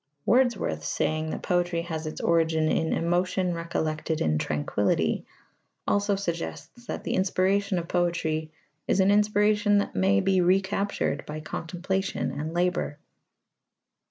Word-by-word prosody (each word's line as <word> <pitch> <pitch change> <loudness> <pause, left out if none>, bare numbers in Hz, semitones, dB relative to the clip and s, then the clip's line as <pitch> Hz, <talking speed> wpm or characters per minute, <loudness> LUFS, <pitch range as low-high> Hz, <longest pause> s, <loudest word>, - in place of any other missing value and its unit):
Wordsworth's 235 - +2
saying 155 0 -1
that - - -5
poetry 175 -1 0
has 160 -2 -4
its 155 - -5
origin 160 -1 +2
in 160 -1 +1
"emotion 180 +1 0
recollected 160 -2 -2
in 75 -1 +1
tranquillity" 80 +2 0 0.6
also 205 0 +2
suggests 195 +6 -5
that - - -4
the - - -2
inspiration 190 +1 +1
of 170 -1 -3
poetry 165 -3 -1 0.4
is - - +2
an 190 +1 +5
inspiration 210 0 +3
that 200 - 0
may 95 +1 +3
be 190 - +2
recaptured 190 -3 +1
by 150 +1 -5
contemplation 180 +5 -3
and 155 +2 -4
labour. 175 -3 0
175 Hz, 130 wpm, -27 LUFS, 155-195 Hz, 0.6 s, an